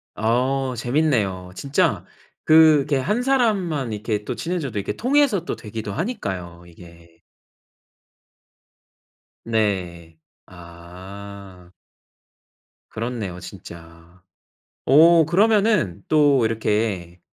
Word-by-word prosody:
아 130 Hz, +4 st, 0 dB
재밌네요. 115 Hz, -8 st, -1 dB
진짜 140 Hz, 0 st, 0 dB, 0.4 s
그게 155 Hz, -3 st, +5 dB
1 210 Hz, -, -1 dB
사람만 200 Hz, -, 0 dB
이렇게 105 Hz, 0 st, -3 dB
또 -, -, -4 dB
친해져도 145 Hz, -, -3 dB
이렇게 100 Hz, -, -3 dB
통해서 255 Hz, -, +1 dB
또 -, -, -3 dB
되기도 105 Hz, -1 st, -7 dB
하니까요 95 Hz, -, -5 dB
이게. 85 Hz, -1 st, -17 dB, 2.2 s
네. 90 Hz, -7 st, -2 dB, 0.3 s
아. 90 Hz, +2 st, -12 dB, 1.2 s
그렇네요 110 Hz, -6 st, -5 dB
진짜. 85 Hz, -1 st, -13 dB, 0.6 s
오 160 Hz, +3 st, +6 dB
그러면은 195 Hz, -, +2 dB
또 145 Hz, -5 st, +3 dB
이렇게 105 Hz, -5 st, -2 dB
110 Hz, 185 characters per minute, -22 LUFS, -, 2.2 s, 오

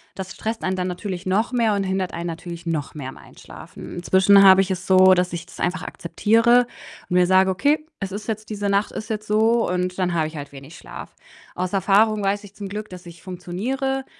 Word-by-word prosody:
Das 190 Hz, 0 st, -6 dB
stresst 225 Hz, +1 st, -4 dB
einen 190 Hz, -, 0 dB
dann 180 Hz, 0 st, -2 dB
natürlich 185 Hz, 0 st, -5 dB
noch 210 Hz, +6 st, +1 dB
mehr 230 Hz, -4 st, +2 dB
und 200 Hz, -, 0 dB
hindert 190 Hz, -1 st, -2 dB
einen 170 Hz, 0 st, -5 dB
natürlich 170 Hz, +1 st, -7 dB
noch 155 Hz, -4 st, -3 dB
mehr 135 Hz, -3 st, -6 dB
am -, -, -12 dB
Einschlafen. -, -, -12 dB
Inzwischen 190 Hz, +3 st, +5 dB
habe 190 Hz, 0 st, +8 dB
ich 195 Hz, 0 st, -2 dB
es 185 Hz, 0 st, -4 dB
so, 185 Hz, 0 st, +7 dB
dass 180 Hz, 0 st, +1 dB
ich 170 Hz, -, -5 dB
das -, -, -15 dB
einfach 180 Hz, +1 st, -1 dB
akzeptiere 230 Hz, +8 st, +2 dB, 0.4 s
und 180 Hz, -, -1 dB
mir 180 Hz, -1 st, +4 dB
sage: 190 Hz, +1 st, +4 dB
„Okay, 290 Hz, +11 st, +1 dB
es 195 Hz, -1 st, -4 dB
ist 205 Hz, +2 st, -6 dB
jetzt 215 Hz, -1 st, -4 dB
diese 205 Hz, -1 st, -2 dB
Nacht 200 Hz, +1 st, +1 dB
ist 215 Hz, -, -7 dB
jetzt 215 Hz, -1 st, -3 dB
so, 225 Hz, +2 st, +2 dB
und 180 Hz, 0 st, -2 dB
dann 180 Hz, -1 st, 0 dB
habe 160 Hz, -2 st, +1 dB
ich 155 Hz, -, -10 dB
halt 145 Hz, -1 st, -7 dB
wenig 140 Hz, +4 st, -12 dB
Schlaf.“ -, -, -10 dB, 0.4 s
Aus 185 Hz, +1 st, -3 dB
Erfahrung 205 Hz, +2 st, +3 dB
weiß 200 Hz, +1 st, 0 dB
ich 200 Hz, -, -15 dB
zum 200 Hz, -1 st, -7 dB
Glück, 210 Hz, +2 st, -6 dB
dass 180 Hz, 0 st, -11 dB
ich 170 Hz, -1 st, -13 dB
funktioniere, 230 Hz, +10 st, -3 dB
190 Hz, 225 wpm, -22 LUFS, 180-210 Hz, 0.4 s, habe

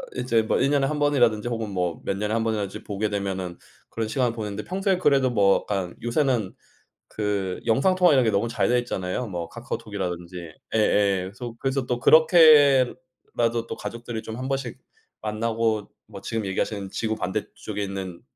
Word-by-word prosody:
이제 120 Hz, -2 st, +1 dB
뭐 110 Hz, -, 0 dB
1 135 Hz, -, +2 dB
년에 140 Hz, -2 st, +2 dB
1 150 Hz, -, -2 dB
번이라든지 120 Hz, -7 st, +2 dB
혹은 115 Hz, -3 st, -3 dB
뭐 90 Hz, -4 st, -2 dB
몇 100 Hz, -, -1 dB
년에 105 Hz, +1 st, -2 dB
1 115 Hz, 0 st, +1 dB
번이라든지 105 Hz, -4 st, -3 dB
보게 105 Hz, +1 st, -2 dB
되면은 95 Hz, -3 st, -3 dB, 0.3 s
그런 115 Hz, -1 st, -3 dB
시간을 120 Hz, +1 st, 0 dB
보냈는데 105 Hz, -2 st, -5 dB
평소에 190 Hz, +1 st, 0 dB
그래도 140 Hz, -7 st, +3 dB
뭐 100 Hz, -5 st, +4 dB
약간 95 Hz, -4 st, -2 dB
요새는 120 Hz, -4 st, 0 dB, 0.5 s
그 100 Hz, -3 st, -2 dB
영상 135 Hz, +11 st, +3 dB
통화 180 Hz, -4 st, +5 dB
이런 130 Hz, -3 st, +4 dB
게 110 Hz, -, +3 dB
너무 105 Hz, +3 st, 0 dB
잘 115 Hz, -, 0 dB
되어 125 Hz, 0 st, +3 dB
있잖아요, 120 Hz, 0 st, -3 dB
뭐 85 Hz, -5 st, -5 dB
카카오톡이라든지. 95 Hz, -8 st, -5 dB, 0.4 s
예예 100 Hz, -3 st, +2 dB
계속 120 Hz, 0 st, -8 dB
그래서 135 Hz, 0 st, -1 dB
또 125 Hz, -1 st, -2 dB
그렇게라도 135 Hz, -7 st, +4 dB
또 -, -, -5 dB
가족들이 115 Hz, -1 st, -6 dB
좀 110 Hz, -, -7 dB
한번씩 130 Hz, -2 st, -3 dB, 0.4 s
만나고 110 Hz, 0 st, -1 dB, 0.2 s
뭐 -, -, -10 dB
지금 110 Hz, -3 st, -3 dB
얘기하시는 100 Hz, +1 st, -2 dB
지구 110 Hz, -1 st, -2 dB
반대쪽에 95 Hz, +2 st, -4 dB
있는 95 Hz, -3 st, -5 dB
115 Hz, 375 characters per minute, -24 LUFS, 100-130 Hz, 0.5 s, 통화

